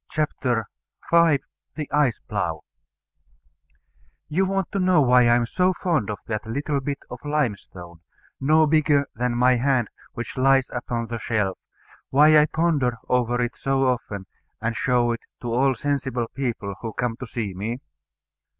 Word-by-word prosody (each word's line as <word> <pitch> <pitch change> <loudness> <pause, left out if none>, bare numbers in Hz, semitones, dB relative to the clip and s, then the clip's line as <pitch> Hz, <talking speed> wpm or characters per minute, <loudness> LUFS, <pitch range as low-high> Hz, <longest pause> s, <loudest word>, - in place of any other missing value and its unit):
CHAPTER 125 -7 -1 0.5
V 165 -5 +5 0.3
THE 150 -2 -4
ICE 145 -5 +2
PLOUGH - - -2 1.7
You 185 +5 +1
want 195 -1 -1
to 200 - -1
know 185 -3 +4
why 125 -3 +5
I 120 - +5
am 120 0 +2
so 185 +9 +1
fond 165 - -1
of 105 - -3
that 110 0 -4
little 140 +5 -1
bit 140 +1 -3
of 125 - -6
limestone, 100 - -3 0.4
no 155 +3 +4
bigger 150 -2 +3
than 120 +1 -1
my 125 +1 +4
hand, 130 -3 +1 0.2
which 120 +3 -6
lies 135 0 +3
upon 120 -1 -3
the 115 0 -5
shelf; 105 -4 -1 0.5
why 150 +3 +6
I 150 0 +6
ponder 150 -8 +1
over 120 -1 +1
it 120 - -3
so 135 0 0
often, 105 -6 -3 0.3
and 115 +1 -2
show 120 0 +2
it 115 - -3 0.2
to 120 -1 -3
all 130 +2 +3
sensible 130 -4 -1
people 115 -7 -3
who 115 -2 -5
come 120 0 -2
to 125 - -7
see 110 -5 -4
me? 110 +6 -3
125 Hz, 160 wpm, -24 LUFS, 115-150 Hz, 1.7 s, why